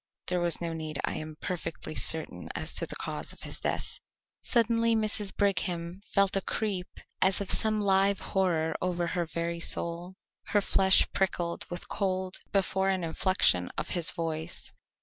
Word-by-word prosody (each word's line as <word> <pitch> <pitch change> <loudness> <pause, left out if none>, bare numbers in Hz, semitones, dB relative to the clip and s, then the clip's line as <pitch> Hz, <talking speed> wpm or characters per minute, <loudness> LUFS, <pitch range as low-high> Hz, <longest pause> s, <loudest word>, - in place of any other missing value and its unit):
"There 180 0 0
was 175 -1 +1
no 170 -1 -3
need. 155 -2 -5
I - - -1
am 155 0 -7
perfectly 180 -2 -5
certain - - +1
as - - -2
to - - +5
the - - -5
cause - - -4
of - - -14
his - - -4
death." - - -3 0.4
Suddenly 230 -1 +2
Mrs. 215 -2 0
Brigham 180 -2 -1
felt 200 -1 +3
a 195 - +2
creep 195 -3 -2 0.3
as 190 +1 +4
of 200 -2 0
some 215 -1 +5
live 195 -1 +3
horror 170 -5 0
over 175 -1 -1
her 170 -1 -2
very 170 +1 -3
soul. 170 +2 0 0.3
Her 205 - +2
flesh 190 -1 +4
prickled 175 -3 -1
with 175 0 -5
cold, 185 -2 -2
before 190 -1 +1
an 190 -2 0
inflection 160 - +2
of - - -2
his 175 -3 +3
voice. 165 0 -3
185 Hz, 165 wpm, -29 LUFS, 170-195 Hz, 0.4 s, to